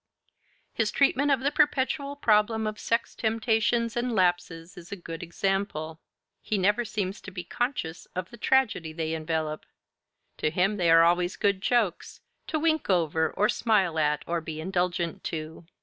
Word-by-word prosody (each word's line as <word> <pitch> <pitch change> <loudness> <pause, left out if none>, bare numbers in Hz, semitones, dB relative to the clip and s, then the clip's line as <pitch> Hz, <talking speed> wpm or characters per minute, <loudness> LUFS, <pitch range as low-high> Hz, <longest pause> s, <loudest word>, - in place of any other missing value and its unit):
His 225 -2 0
treatment 280 +2 +2
of 270 -3 +2
the 280 +2 +1
perpetual 280 0 +1
problem 220 -3 +2
of 215 0 -4
sex 230 0 -1
temptations 225 +1 0
and 240 -1 -1
lapses 175 -2 0
is 175 -1 -12
a - - -3
good 165 -3 -8
example: 170 -3 -2 0.4
he 215 - -1
never 205 +5 +2
seems 200 -3 -3
to - - -9
be 180 -2 -6
conscious 180 -5 -3
of 185 -1 -4
the 235 - -11
tragedy 225 -10 +1
they 160 0 -3
envelop. 155 -1 -2 0.7
To - - 0
him 185 +6 +1
they 175 -3 +2
are 165 0 +7
always 175 +2 +2
good 200 -2 +1
jokes, 220 -6 0 0.3
to 315 - -1
wink 315 -3 0
over 160 -3 +2
or 210 - +1
smile 195 -10 +1
at 150 -1 +1
or 170 0 -2
be 160 -1 -6
indulgent 175 -1 -2
to. 160 +1 -6
190 Hz, 165 wpm, -27 LUFS, 165-230 Hz, 0.7 s, are